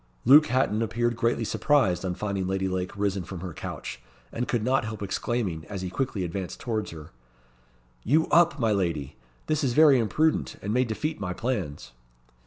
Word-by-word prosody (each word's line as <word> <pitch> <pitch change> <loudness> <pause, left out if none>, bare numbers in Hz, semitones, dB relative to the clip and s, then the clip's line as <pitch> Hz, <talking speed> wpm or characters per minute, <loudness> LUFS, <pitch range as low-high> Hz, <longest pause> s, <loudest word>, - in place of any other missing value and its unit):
Luke 150 +5 +8
Hatton 115 -3 +1
appeared 120 +1 0
greatly 115 0 0
surprised 115 - +2
on 90 -1 -2
finding 100 -2 -2
Lady 95 0 -1
Lake 95 +1 -3
risen 100 -2 0
from 90 0 -8
her 90 -3 -6
couch, - - -7 0.3
and 120 +2 -3
could 120 -3 0
not 130 +1 +2
help 110 -1 -5
exclaiming, 95 -4 -2
as 100 -2 -6
he 90 - -4
quickly 105 -2 -2
advanced 90 +1 -5
towards 110 -3 -2
her 80 -2 -10 0.9
"You 155 - +3
up, 170 -3 +4
my 115 -3 +2
lady! 85 -9 -1 0.3
This 155 -1 0
is 130 -3 +1
very 150 -2 +6
imprudent, 155 +8 +1
and 105 - -2
may 125 +2 +3
defeat 150 +7 -3
my 90 -2 -3
plans." 90 - -3
110 Hz, 180 wpm, -26 LUFS, 95-125 Hz, 0.9 s, Luke